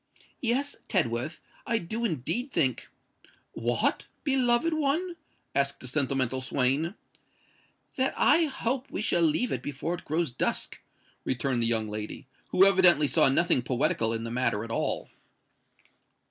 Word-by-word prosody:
"Yes, 265 +4 0
Tedworth—I 155 - -2
do 220 +5 -4
indeed 225 - -2
think——" 135 - 0 0.6
"What? 120 0 -1 0.2
beloved 265 +2 +2
one!" 315 +4 -1 0.4
asked 140 0 +1
the 130 - -9
sentimental 130 -2 +1
swain. 140 +7 +1 1.0
"That 260 0 0
I 325 +2 +4
hope 265 -1 -3
we 210 - -4
shall 175 - +1
leave 165 +10 +1
it - - -2
before 145 +4 -4
it 175 - -7
grows 160 -2 -1
dusk," 120 - -2 0.4
returned 130 -1 -1
the 115 - +3
young 110 -2 +1
lady, 105 +5 -6 0.2
who 190 - +4
evidently 185 -6 +6
saw 135 - +4
nothing 170 0 +3
poetical 125 -2 0
in 115 0 -3
the 115 - -5
matter 120 -4 0
at 115 - -8
all. - - -1
155 Hz, 135 wpm, -27 LUFS, -, 1.0 s, evidently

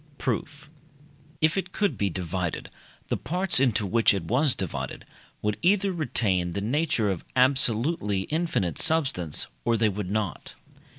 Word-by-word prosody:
Proof. 140 +4 -3 0.7
If 155 +3 +3
it 185 -1 -2
could 205 -2 0
be 100 - 0
divided, 90 0 -3 0.4
the - - 0
parts 180 -2 +1
into 115 -5 +2
which 105 +2 +3
it 95 - -3
was 125 - +2
divided 95 -4 -5 0.4
would 105 0 0
either 195 +2 +2
retain 100 - 0
the 100 - -2
nature 120 -1 0
of 90 - -4
absolutely 125 - +2
infinite 150 - -1
substance, 135 - +1 0.2
or 115 - +2
they 110 -1 +3
would 100 -2 -4
not. 105 -3 -3
115 Hz, 140 wpm, -26 LUFS, 100-155 Hz, 0.7 s, If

